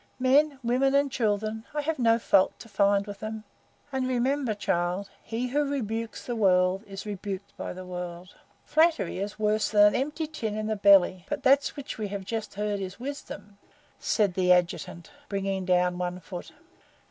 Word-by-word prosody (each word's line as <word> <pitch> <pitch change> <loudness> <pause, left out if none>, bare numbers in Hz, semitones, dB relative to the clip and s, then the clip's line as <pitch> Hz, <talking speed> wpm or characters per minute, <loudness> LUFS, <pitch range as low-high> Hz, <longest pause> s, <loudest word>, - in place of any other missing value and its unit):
Men, 275 +3 +3
women, 260 +3 +2
and 280 -1 +3
children 215 -1 -1
I 295 - +1
have 310 0 -2
no 230 -1 +4
fault 195 -4 +3
to - - -12
find 200 -2 +2
with 205 -1 -8
them. 215 0 -5 0.5
And 265 -1 -1
remember, 255 -1 0
child, 180 0 -1
he 235 +3 -3
who 290 +4 +1
rebukes 230 -5 -3
the 240 - -3
World 185 -2 +3
is 195 +1 -8
rebuked 200 -1 -6
by - - -5
the 185 0 -8
World." 180 0 -7 0.3
"Flattery 315 - +2
is 205 +2 -4
worse 215 0 +1
than 205 -1 +6
an 210 - +4
empty 300 +4 -1
tin 235 -9 -4
can 215 - -3
in - - -4
the 220 0 -1
belly. 195 -3 +5
But 295 - -3
that 275 +1 +5
which 280 -5 -7
we 215 - -2
have 200 -1 -5
just 220 0 -4
heard 205 0 -1
is 190 +1 -6
wisdom," 245 -6 -8 0.4
said 205 -4 +1
the 180 0 +2
Adjutant, 175 -1 0 0.2
bringing 195 -1 -2
down 180 -1 +2
one 180 0 -3
foot. 180 0 -8
210 Hz, 180 wpm, -27 LUFS, 190-250 Hz, 0.5 s, than